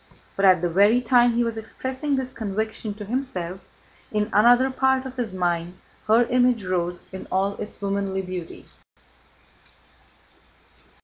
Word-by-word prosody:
But 195 Hz, -, +1 dB
at 185 Hz, -2 st, +5 dB
the 175 Hz, -, +1 dB
very 205 Hz, +7 st, +5 dB
time 245 Hz, -1 st, +4 dB
he 240 Hz, +1 st, +2 dB
was 230 Hz, -1 st, -2 dB
expressing 260 Hz, +6 st, -3 dB
this 260 Hz, -1 st, -3 dB
conviction 220 Hz, 0 st, -4 dB
to 210 Hz, 0 st, -8 dB
himself, 195 Hz, -7 st, -3 dB, 0.5 s
in 210 Hz, 0 st, -1 dB
another 245 Hz, +5 st, +5 dB
part 265 Hz, 0 st, +1 dB
of 260 Hz, 0 st, -7 dB
his 240 Hz, -5 st, -2 dB
mind 175 Hz, -1 st, -2 dB, 0.3 s
her 225 Hz, +3 st, +5 dB
image 245 Hz, -3 st, +2 dB
rose 175 Hz, -1 st, -2 dB
in 190 Hz, -, -8 dB
all 195 Hz, +2 st, +1 dB
its 210 Hz, -, -7 dB
womanly 195 Hz, -1 st, -1 dB
beauty. 180 Hz, -2 st, -7 dB
215 Hz, 140 wpm, -24 LUFS, 190-245 Hz, 0.5 s, at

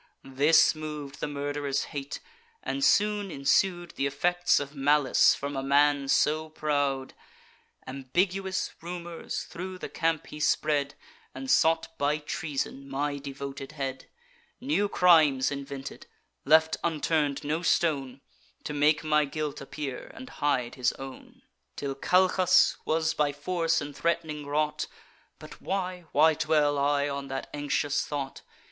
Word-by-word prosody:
This 140 Hz, +4 st, +4 dB
mov'd 150 Hz, -2 st, -7 dB
the -, -, -2 dB
murderer's 145 Hz, -1 st, -2 dB
hate; 140 Hz, -1 st, -5 dB, 0.4 s
and 275 Hz, -, -2 dB
soon 210 Hz, -4 st, +3 dB
ensued 175 Hz, +4 st, +1 dB
Th' -, -, -20 dB
effects 175 Hz, +6 st, +2 dB
of 145 Hz, 0 st, -6 dB
malice 145 Hz, 0 st, +4 dB
from 140 Hz, 0 st, -5 dB
a 135 Hz, -, -1 dB
man 140 Hz, +1 st, +3 dB
so 155 Hz, +3 st, +2 dB
proud. 145 Hz, -3 st, -1 dB, 0.7 s
Ambiguous 185 Hz, +9 st, -1 dB
rumours 170 Hz, 0 st, -5 dB
thro' 185 Hz, +2 st, -7 dB
the -, -, -7 dB
camp 165 Hz, -1 st, -1 dB
he 150 Hz, -, -10 dB
spread, 145 Hz, -2 st, +1 dB, 0.4 s
And 130 Hz, 0 st, -3 dB
sought, 165 Hz, 0 st, +3 dB
by 145 Hz, +1 st, +2 dB
treason, 140 Hz, -2 st, -4 dB
my 145 Hz, +1 st, -2 dB
devoted 140 Hz, 0 st, -7 dB
head; 135 Hz, -3 st, -5 dB, 0.5 s
New 245 Hz, -7 st, 0 dB
crimes 155 Hz, -9 st, +4 dB
invented; 140 Hz, -1 st, -7 dB, 0.4 s
left 160 Hz, +2 st, +4 dB
unturn'd 155 Hz, -3 st, 0 dB
no 155 Hz, +3 st, -1 dB
stone, 140 Hz, -7 st, 0 dB, 0.4 s
To 150 Hz, -, -4 dB
make 150 Hz, +2 st, +3 dB
my 150 Hz, -1 st, +3 dB
guilt 150 Hz, 0 st, -4 dB
appear, 135 Hz, -1 st, -6 dB
and 260 Hz, -, -9 dB
hide 125 Hz, -5 st, 0 dB
his 125 Hz, -1 st, 0 dB
own; 135 Hz, -1 st, -11 dB, 0.3 s
Till 140 Hz, -1 st, -3 dB
Calchas 180 Hz, +4 st, +4 dB
was 160 Hz, 0 st, +1 dB
by 150 Hz, -2 st, +1 dB
force 165 Hz, +3 st, 0 dB
and 145 Hz, -1 st, -7 dB
threat'ning 160 Hz, -3 st, -2 dB
wrought: 150 Hz, +1 st, -1 dB, 0.5 s
But -, -, -12 dB
why—why 180 Hz, -5 st, +1 dB
dwell 150 Hz, -2 st, +2 dB
I 145 Hz, 0 st, +2 dB
on 140 Hz, -1 st, -4 dB
that 135 Hz, 0 st, -5 dB
anxious 145 Hz, 0 st, 0 dB
thought? 140 Hz, -2 st, -5 dB
150 Hz, 130 wpm, -28 LUFS, 140-165 Hz, 0.7 s, This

